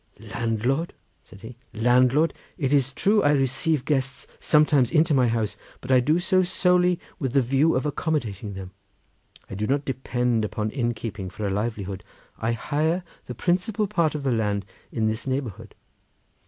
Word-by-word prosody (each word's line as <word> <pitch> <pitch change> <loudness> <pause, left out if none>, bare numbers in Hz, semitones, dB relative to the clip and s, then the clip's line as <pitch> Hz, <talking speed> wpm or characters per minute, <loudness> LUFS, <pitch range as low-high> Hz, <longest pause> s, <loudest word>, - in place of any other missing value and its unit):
"Landlord!" 120 +8 -2 0.3
said 95 - -16
he, 115 +2 -10 0.2
"landlord! 125 +7 +3 0.2
It 140 -5 0
is 140 -2 +3
true 205 - +2
I 145 - +4
receive 135 +2 +1
guests 135 -2 -1
sometimes 150 -4 +4
into 160 0 +3
my 130 -3 +4
house, 110 -3 -1 0.2
but - - -5
I 130 - +6
do 150 +6 +2
so 185 +1 +3
solely 180 -1 +2 0.2
with 135 -6 -2
the 140 - +5
view 135 +6 +2
of 130 - 0
accommodating 115 - -2
them; 95 -1 -8 0.8
I - - -9
do 105 +2 -2
not 140 +2 0
depend 125 -3 0
upon 105 0 -2
innkeeping 115 -6 -3
for 105 +3 -5
a 100 - 0
livelihood. 100 -2 -3 0.4
I 115 +1 0
hire 155 +8 -1 0.2
the 125 - -6
principal 185 - 0
part 170 -7 0
of 145 - -4
the 135 - +1
land 105 -4 0 0.3
in 110 -2 -1
this 110 +4 -2
neighbourhood." 115 -6 -4
130 Hz, 165 wpm, -25 LUFS, 110-155 Hz, 0.8 s, I